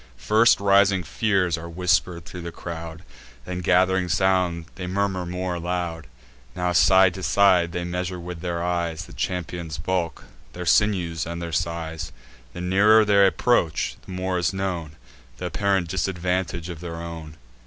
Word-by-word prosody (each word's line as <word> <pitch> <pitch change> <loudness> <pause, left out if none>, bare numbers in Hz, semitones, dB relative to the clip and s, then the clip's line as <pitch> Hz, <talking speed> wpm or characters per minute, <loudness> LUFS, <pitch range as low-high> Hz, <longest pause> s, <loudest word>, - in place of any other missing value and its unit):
First 110 - +4
rising 100 -1 +4
fears 90 0 0
are 85 +1 -8
whisper'd 85 -1 0
thro' 90 0 -8
the 85 0 -6
crowd; 85 0 -7 0.4
Then, 90 0 -4
gath'ring 95 +1 +2
sound, 90 -2 +1
they 90 -2 -6
murmur 95 -1 -1
more 90 +1 -3
aloud. 85 -3 -3 0.5
Now, 90 0 0
side 95 +2 +5
to 95 - -7
side, 90 -3 +3
they 90 +1 -3
measure 90 +1 -3
with 85 -1 -7
their 85 -1 -2
eyes 85 -2 -2
The - - -14
champions' 85 -3 -4
bulk, 85 0 -2 0.3
their 90 0 -6
sinews, 85 -5 +2
and 85 0 -5
their 85 -1 -5
size: 85 -1 -3 0.4
The 90 - -6
nearer 105 +4 +5
they 100 -1 +5
approach, 95 -6 +1
the - - -11
more 95 0 -2
is 85 +2 0
known 90 -5 -3 0.4
Th' - - -9
apparent 100 -3 0
disadvantage 90 -1 -2
of 85 -3 -7
their 85 -1 -6
own. 85 -2 -8
90 Hz, 155 wpm, -24 LUFS, 85-95 Hz, 0.5 s, side